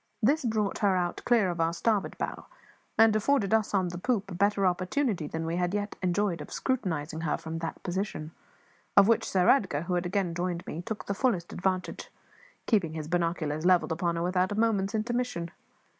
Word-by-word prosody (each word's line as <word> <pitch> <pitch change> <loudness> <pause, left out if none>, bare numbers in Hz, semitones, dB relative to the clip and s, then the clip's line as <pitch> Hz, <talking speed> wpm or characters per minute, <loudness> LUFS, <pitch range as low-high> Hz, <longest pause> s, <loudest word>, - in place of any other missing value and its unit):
This 290 +7 +3
brought 215 -3 0
her 200 -3 +3
out 175 -1 -2
clear 225 -7 +3
of 170 -1 -3
our 165 +1 +1
starboard 210 +3 0
bow, - - -4 0.5
and 225 -1 +6
afforded 215 -2 +2
us 220 -2 +2
on 185 -3 +1
the 175 0 -6
poop 205 -2 -1
a - - -4
better 200 +2 +2
opportunity 185 - 0
than 160 +2 -4
we 165 +1 -2
had 180 +2 0
yet 205 0 -2
enjoyed 185 -2 0
of - - -9
scrutinising 165 - -2
her 160 - 0
from 160 +1 -5
that 165 0 -5
position; 180 -4 -3 0.7
of 200 0 +8
which 230 -1 +2
Sir 185 -2 +2
Edgar, 185 - +3
who 180 - -3
had 175 0 0
again 190 -2 -1
joined 175 +1 -3
me, 165 - -5
took 220 +3 -5
the 200 - -1
fullest 195 -6 0
advantage, 185 0 -2 0.6
keeping 190 -9 +1
his 155 -2 -5
binoculars 165 -3 -1
levelled 180 -1 +4
upon 170 +1 0
her 170 - -1
without 180 +1 +1
a - - -1
moment's 215 -2 +1
intermission. 225 -6 -2
185 Hz, 195 wpm, -28 LUFS, 170-210 Hz, 0.7 s, of